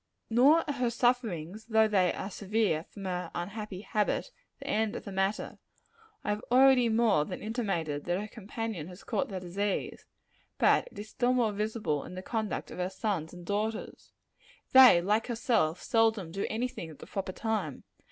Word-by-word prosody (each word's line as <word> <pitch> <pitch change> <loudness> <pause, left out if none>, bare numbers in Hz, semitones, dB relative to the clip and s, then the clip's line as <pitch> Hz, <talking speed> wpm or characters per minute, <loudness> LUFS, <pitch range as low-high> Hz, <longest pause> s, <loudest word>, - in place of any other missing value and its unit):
Nor 280 +8 +6
are 290 - -1
her 250 -2 +1
sufferings 220 -6 0
though 220 -1 +4
they 190 -4 +3
are 195 - -5
severe 200 -5 0
from 200 -2 -10
her 180 -1 -3
unhappy 195 +1 -5
habit, 215 - -1 0.3
the - - -10
end 220 +1 0
of - - -5
the 200 - -7
matter. 195 +2 -1 0.6
I - - -1
have 210 +1 -3
already 255 -1 +6
more 220 -8 +3
than - - -6
intimated 195 - -2
that 175 +1 0
her 210 - -5
companion 215 -5 -5
has 180 +1 -11
caught 215 -4 -1
the 190 -2 -4
disease; 190 +3 -3 0.5
but - - +4
it - - -16
is 210 +1 -7
still 245 +3 +1
more 240 -4 +2
visible 210 -7 -2
in - - -9
the 185 - -6
conduct 220 -4 -3
of - - -8
her 180 0 0
sons 190 -5 -2
and 175 -1 -11
daughters. 210 +3 -3 0.6
They, 255 -10 +8
like 210 +4 +1
herself, 225 -9 0
seldom 220 -6 +2
do 195 +3 -2
any 235 +3 -1
thing 170 -9 -8
at 155 - -12
the - - -11
proper 195 -1 -4
time. 205 - -3
210 Hz, 180 wpm, -30 LUFS, 185-225 Hz, 0.6 s, They